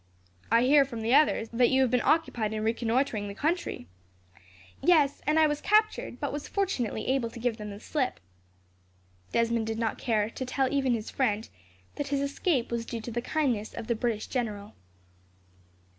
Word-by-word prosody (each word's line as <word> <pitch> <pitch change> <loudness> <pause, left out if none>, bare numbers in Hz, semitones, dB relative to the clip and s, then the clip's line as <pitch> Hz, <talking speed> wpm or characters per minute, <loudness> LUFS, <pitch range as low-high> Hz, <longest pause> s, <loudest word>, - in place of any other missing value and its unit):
"I 230 +1 +5
hear, 280 +2 +6
from 240 -4 -6
the 230 +3 +1
others, 285 -6 +4
that 240 +1 +4
you 265 0 +3
have 250 - 0
been 250 -2 +3
occupied 240 -10 +1
in 215 0 -2
reconnoitring 230 -1 0
the 200 - -7
country." 320 - -2 1.0
"Yes, 300 -5 +3
and 305 +1 +3
I 315 - +6
was 295 -1 -1
captured, 430 - +1
but 285 - -3
was 290 0 -5
fortunately 270 - -1
able 260 -3 +1
to 230 - -10
give 235 -1 -1
them 210 -1 -6
the 200 0 -8
slip." 265 +2 -2 1.1
Desmond 230 -1 +1
did 225 0 -2
not 225 -1 -2
care 215 -2 0
to 260 - -5
tell 260 +1 0
even 270 -3 +2
his 220 -1 -3
friend 220 -5 0 0.5
that 290 - -2
his 280 0 0
escape 280 -2 0
was 235 -1 -1
due 230 -2 -4
to 235 - -6
the 240 +1 -2
kindness 245 -7 -1
of - - -5
the 235 - 0
British 225 -1 -2
general. 210 -5 -4
240 Hz, 185 wpm, -28 LUFS, 225-280 Hz, 1.1 s, hear